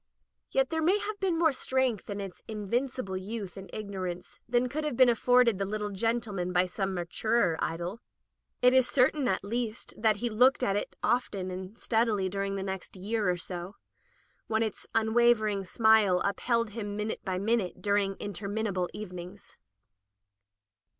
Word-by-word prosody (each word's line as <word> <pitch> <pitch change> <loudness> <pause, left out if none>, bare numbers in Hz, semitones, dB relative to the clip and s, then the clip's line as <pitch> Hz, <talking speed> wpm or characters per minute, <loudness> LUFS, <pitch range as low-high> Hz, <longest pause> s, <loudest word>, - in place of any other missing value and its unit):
Yet - - +1
there 320 0 0
may 360 +6 +4
have 420 0 -4
been 370 -4 +1
more 325 -3 +4
strength 260 -5 0
in 200 0 -3
its 195 -2 -7
invincible 220 0 -2
youth 200 0 -5
and 195 -1 -9
ignorance 185 -4 -5
than 245 +1 +2
could 300 +5 -3
have 300 -6 -2
been 255 -1 +7
afforded 240 -2 +4
the 195 - 0
litde 210 0 -3
gendeman 210 -4 -1
by 180 0 +3
some 190 +1 -2
maturer 175 +2 +1
idol. 175 +6 -3 0.6
It 250 0 +7
is 260 -1 +4
certain, 270 +1 +3
at 190 - 0
least, 230 +2 -3
that 215 -1 +3
he 240 +4 -2
looked 250 +4 +4
at 200 -4 +2
it 205 - -3
often 200 -6 0
and 185 +4 -7
steadily 220 -6 +1
during 195 +1 -2
the 195 - -3
next 190 0 -5
year 205 +1 -1
or 180 - +1
so, 175 +2 -6 0.7
when 220 0 +1
its 220 -3 -4
unwavering 220 -3 +3
smile 220 -2 +4
upheld 230 +3 0
him 205 -2 -5
min 210 +1 -1
ute - - -6
by 185 -2 -2
minute 200 -2 0
during 200 0 +1
interminable 200 -2 -2
evenings. 185 -1 -9
210 Hz, 165 wpm, -29 LUFS, 190-240 Hz, 0.7 s, been